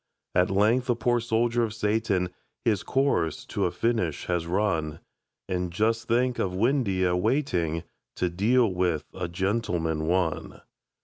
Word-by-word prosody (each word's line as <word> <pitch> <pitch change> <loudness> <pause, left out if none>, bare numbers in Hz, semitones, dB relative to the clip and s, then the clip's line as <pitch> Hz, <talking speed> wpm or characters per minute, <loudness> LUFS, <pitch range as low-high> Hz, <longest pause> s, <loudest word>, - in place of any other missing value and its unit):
At 90 0 +3
length 110 +6 +2
the 120 - +2
poor 120 +1 +1
soldier 115 +1 +1
of 110 -2 -1
Satan 105 -4 0 0.3
His 105 -6 +2
course 135 - 0
to - - -1
a 90 - 0
finish 90 -4 -1
has 85 -2 -1
run 85 -5 0 0.5
And 90 -1 -2
just 115 +5 0
think 125 +1 +1
of 90 -1 -1
Windeyer 100 -6 +2
waiting 90 - 0 0.3
To 90 - 0
deal 105 +5 +2
with 90 -4 0
"A 90 -2 -3
Gentleman, 85 -4 -1
One"! 90 -2 -1
95 Hz, 140 wpm, -27 LUFS, 90-115 Hz, 0.5 s, At